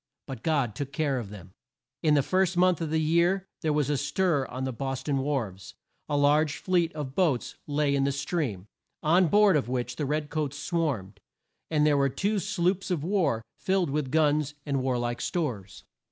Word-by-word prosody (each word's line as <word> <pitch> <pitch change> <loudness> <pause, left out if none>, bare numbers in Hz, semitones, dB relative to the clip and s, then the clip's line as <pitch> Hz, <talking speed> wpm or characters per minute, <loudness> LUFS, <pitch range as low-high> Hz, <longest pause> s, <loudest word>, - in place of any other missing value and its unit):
But 130 -5 -7
God 140 -8 +1
took 140 +4 -5
care 140 -2 0
of 110 -5 -7
them. 95 -3 -11 0.5
In 155 -2 +4
the 140 - +3
first 185 +2 +1
month 180 -2 +3
of 160 - -2
the 160 - +1
year 170 +4 +2 0.2
there 155 - +1
was 150 -2 +1
a 145 -1 +1
stir 145 -1 0
on 130 +2 -5
the 130 -1 -2
Bos 135 +2 -4
ton 140 -1 0
wharves. 125 -10 -3 0.3
A 145 - +1
large 150 +1 +3
fleet 175 -3 +1
of 145 -4 -5
boats 150 -7 +1
lay 145 -1 +1
in 140 -1 +2
the 140 - +2
stream, 140 - -2 0.4
on 175 +4 +4
board 205 +1 +5
of 135 -5 0
which 125 -1 -2
the 145 - -2
red 150 +1 -2
coats 145 -2 -2
swarmed, 140 - -2 0.5
and 150 -2 +2
there 150 -1 +4
were 140 0 +3
two 205 +9 0
sloops 195 -1 0
of 170 -6 -1
war 170 - +1 0.2
filled 185 -5 +1
with 145 -2 -1
guns 150 -1 +2
and 140 -3 0
war 130 -1 0
like 120 0 -2
stores. 120 - -3
145 Hz, 195 wpm, -27 LUFS, 130-165 Hz, 0.5 s, board